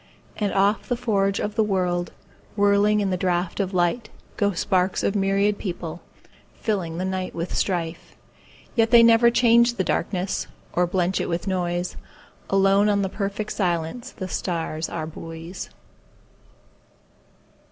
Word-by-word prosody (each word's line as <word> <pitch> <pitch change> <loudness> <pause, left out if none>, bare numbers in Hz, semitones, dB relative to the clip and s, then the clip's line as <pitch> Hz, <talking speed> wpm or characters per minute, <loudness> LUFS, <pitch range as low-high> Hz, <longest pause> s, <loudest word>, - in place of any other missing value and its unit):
And 205 -2 0
off 200 +5 +2
the 245 - 0
forge 200 -4 +1
of 205 - -2
the 220 0 +2
world, 180 -3 0 0.4
Whirling 205 +1 +3
in 195 -2 0
the 185 - 0
draught 180 0 -1
of 195 -2 0
life, 175 +5 +1 0.3
Go 205 -1 +1
sparks 185 +1 0
of 200 - +1
myriad 200 +1 +1
people, 175 -3 -5 0.6
fillingThe 185 -5 -1
night 185 -1 -3
with 170 +1 -3
strife. 170 -3 -2 0.6
Yet 225 -2 +3
they 235 0 +7
never 230 +1 +6
change 235 0 +4
the 190 - 0
darknessOr 180 -1 -2
blench 180 0 0
it - - -3
with 170 0 -2
noise; 180 -1 -1 0.5
Alone 195 +1 +4
on 200 -1 +2
the 190 - -1
perfect 200 +2 -3
silenceThe 180 +2 -2
stars 165 -3 -2
are 155 -2 -4
buoys. 165 +3 -8
195 Hz, 135 wpm, -24 LUFS, 175-205 Hz, 0.6 s, they